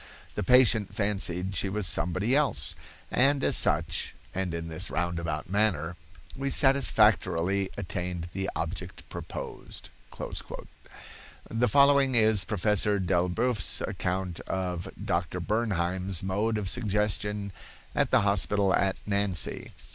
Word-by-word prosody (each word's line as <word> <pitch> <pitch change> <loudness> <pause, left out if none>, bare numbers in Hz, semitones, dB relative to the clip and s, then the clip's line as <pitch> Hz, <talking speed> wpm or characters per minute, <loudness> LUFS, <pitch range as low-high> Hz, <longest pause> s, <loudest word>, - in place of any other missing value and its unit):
The - - -3
patient 115 -2 +4
fancied 95 -2 -1
she 95 +3 0
was 105 +1 -1
somebody 95 +8 +1
else, 145 -1 +1 0.4
and 135 +2 +3
as - - +3
such, - - +2 0.2
and 95 -1 -2
in 85 0 -4
this 80 -1 -1
roundabout 85 -3 -2
manner, 95 -4 0 0.4
we 140 +1 -2
satisfactorily 105 - +3
attained 90 -2 -4
the 95 0 -2
object 90 +2 -5
proposed." - - -7 1.6
The 115 +2 +2
following 140 +1 +5
is 110 -4 +4
Professor 105 +2 +1
Delboeuf's 95 +6 +1
account 90 -1 -3
of 90 -2 -3 0.2
Dr. 85 +1 -1
Bernheim's 95 -3 -1
mode 105 +4 0
of 105 -2 -3
suggestion 105 -1 -1 0.4
at - - +1
the - - +4
hospital 100 0 +2
at 95 -1 +2
Nancy. 100 -5 -1
95 Hz, 115 wpm, -28 LUFS, 90-110 Hz, 1.6 s, following